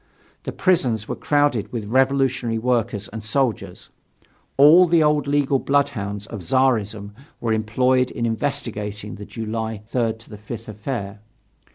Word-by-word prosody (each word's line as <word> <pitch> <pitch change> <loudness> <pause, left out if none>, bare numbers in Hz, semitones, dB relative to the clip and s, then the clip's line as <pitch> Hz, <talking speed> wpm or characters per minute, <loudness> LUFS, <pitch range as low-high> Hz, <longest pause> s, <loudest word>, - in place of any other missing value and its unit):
The - - -3
prisons 125 - +1
were - - -3
crowded 145 -8 +1
with 115 -4 -4
revolutionary 130 -1 +1
workers 115 -3 -1
and 110 0 -7
soldiers. 115 0 -2 0.7
All 160 +6 +8
the 165 -1 +4
old 150 -1 +2
legal 140 -1 +2
bloodhounds 105 -9 -1
of 110 -3 -8
Czarism 110 -1 0 0.3
were 115 -2 0
employed 125 +4 +1
in 120 - -3
investigating 105 -4 -3
the 105 - -9
July 110 -1 -5
3 115 0 0
5 110 0 -10
affair. 105 -1 -5
115 Hz, 130 wpm, -22 LUFS, 105-135 Hz, 0.7 s, All